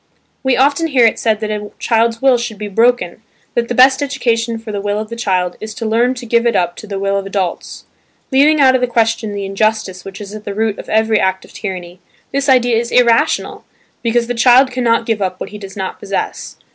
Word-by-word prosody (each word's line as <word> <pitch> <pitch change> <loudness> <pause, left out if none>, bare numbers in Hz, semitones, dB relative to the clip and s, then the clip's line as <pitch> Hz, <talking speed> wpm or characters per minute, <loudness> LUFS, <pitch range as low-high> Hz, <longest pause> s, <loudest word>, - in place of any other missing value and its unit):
We 265 -2 +1
often 285 +5 +2
hear 260 -6 +4
it 225 - +2
said 220 -2 0
that 215 -1 -2
a 210 -1 -4
child's 230 +1 0
will 260 -3 +4
should 235 -3 -5
be 210 0 -5
"broken" 225 -2 +1 0.3
that 235 -1 0
the 245 - -3
best 260 +2 +5
education 235 -5 -1
for 225 -1 -8
the 205 -1 -3
will 205 0 -1
of 215 0 -4
the 230 - -6
child 185 -6 -1
is 215 0 -7
to 230 - -5
learn 235 +4 +1
to 245 -1 -8
give 235 +1 +2
it 230 - +1
up 175 -2 0
to 215 - -9
the 200 -1 -4
will 195 0 0
of 195 0 -4
adults. 195 -3 -4 0.5
Leaving 295 +3 +4
out 265 -2 +6
of 260 - +1
the 250 - +2
question 225 -2 0
the 200 -1 -4
injustice 195 -2 -1
which 195 0 -9
is 205 -1 -8
at 215 0 -8
the 200 - -6
root 220 -1 -1
of - - -9
every 220 0 +2
act 190 0 -1
of - - -19
tyranny, 180 -3 -6 0.3
this 275 +1 -1
idea 245 -3 +4
is 235 +1 -2
irrational 245 +4 +2 0.4
because 235 0 +1
the 245 - -3
child 250 +2 +5
cannot 235 -2 +1
give 225 -3 -1
up 185 -1 -2
what - - -6
he 210 - -9
does 195 -1 -10
not 190 -1 -5
possess. 195 0 -4
225 Hz, 235 wpm, -16 LUFS, 205-245 Hz, 0.5 s, out